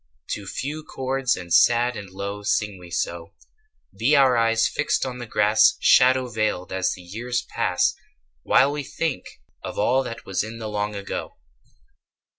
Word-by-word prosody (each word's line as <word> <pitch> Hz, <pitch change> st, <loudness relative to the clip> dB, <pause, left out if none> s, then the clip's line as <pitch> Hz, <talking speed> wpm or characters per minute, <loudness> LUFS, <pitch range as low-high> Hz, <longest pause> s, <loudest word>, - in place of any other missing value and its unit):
To 100 Hz, -, -4 dB
few 150 Hz, +9 st, -4 dB
chords 130 Hz, -3 st, -1 dB
and 85 Hz, -1 st, -5 dB
sad 120 Hz, +1 st, +4 dB
and 100 Hz, -2 st, -8 dB
low 100 Hz, +2 st, -6 dB
Sing 105 Hz, -1 st, -1 dB
we 90 Hz, -1 st, -12 dB
so: 85 Hz, +3 st, -4 dB, 0.6 s
Be 115 Hz, +9 st, +3 dB
our 135 Hz, -3 st, +5 dB
eyes 115 Hz, 0 st, +3 dB
fixed 145 Hz, -, -1 dB
on 125 Hz, -1 st, -5 dB
the 120 Hz, -, -7 dB
grass 105 Hz, 0 st, +4 dB
Shadow 130 Hz, 0 st, +5 dB
veiled 110 Hz, -6 st, -2 dB
as 95 Hz, -1 st, 0 dB
the 90 Hz, -, -11 dB
years 120 Hz, +7 st, -3 dB
pass -, -, 0 dB, 0.5 s
While 135 Hz, -, +4 dB
we 145 Hz, 0 st, -3 dB
think 155 Hz, +1 st, -3 dB, 0.4 s
of -, -, -6 dB
all 125 Hz, +6 st, +2 dB
that 115 Hz, -3 st, -7 dB
was 95 Hz, -1 st, -1 dB
In 110 Hz, +1 st, -7 dB
the 110 Hz, -1 st, -5 dB
long 105 Hz, 0 st, -2 dB
ago. 100 Hz, 0 st, -5 dB
115 Hz, 165 wpm, -23 LUFS, 100-130 Hz, 0.6 s, our